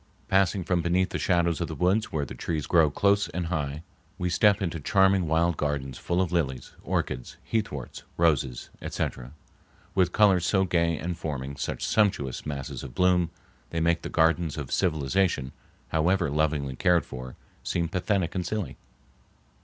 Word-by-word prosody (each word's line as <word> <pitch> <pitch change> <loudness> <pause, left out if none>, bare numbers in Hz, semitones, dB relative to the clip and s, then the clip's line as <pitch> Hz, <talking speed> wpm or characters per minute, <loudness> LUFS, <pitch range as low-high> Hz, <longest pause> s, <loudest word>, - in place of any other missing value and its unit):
Passing 95 0 +3
from 90 0 +1
beneath 90 +2 +1
the - - -2
shadows 85 -3 +1
of - - -1
the - - -6
woods 95 +5 +1
where 75 -2 -1
the - - -8
trees 80 -3 -3
grow 80 -3 +4
close 100 +6 +2
and 90 0 -3
high, 75 -3 -3 0.3
we 90 -2 -1
step 100 +3 +4
into 85 -4 -2
charming 95 +3 +3
wild 80 +1 +2
gardens 70 -4 -2
full 90 +1 +1
of 90 - -4
lilies, 70 -8 -1
orchids, 60 -1 -3
heathworts, 100 - -3 0.2
roses, 75 -7 +1
etc., 60 +1 -4 0.6
with 90 -2 +2
colors 100 -4 +4
so 95 +2 +2
gay 85 -2 +1
and 85 +2 -4
forming 70 -3 -4
such - - -3
sumptuous 95 - +1
masses 70 -3 -4
of 65 -3 -9
bloom, 90 -2 +3 0.4
they 85 - -2
make 85 +1 +2
the - - -5
gardens 80 -1 +2
of 70 -4 -5
civilization, 80 -3 +1 0.4
however 85 0 +1
lovingly 75 -3 0
cared 90 +3 +3
for, 65 0 -8 0.3
seem 85 -1 -1
pathetic 95 +1 0
and 90 -2 -2
silly. 105 -1 -3
85 Hz, 160 wpm, -27 LUFS, 75-90 Hz, 0.6 s, grow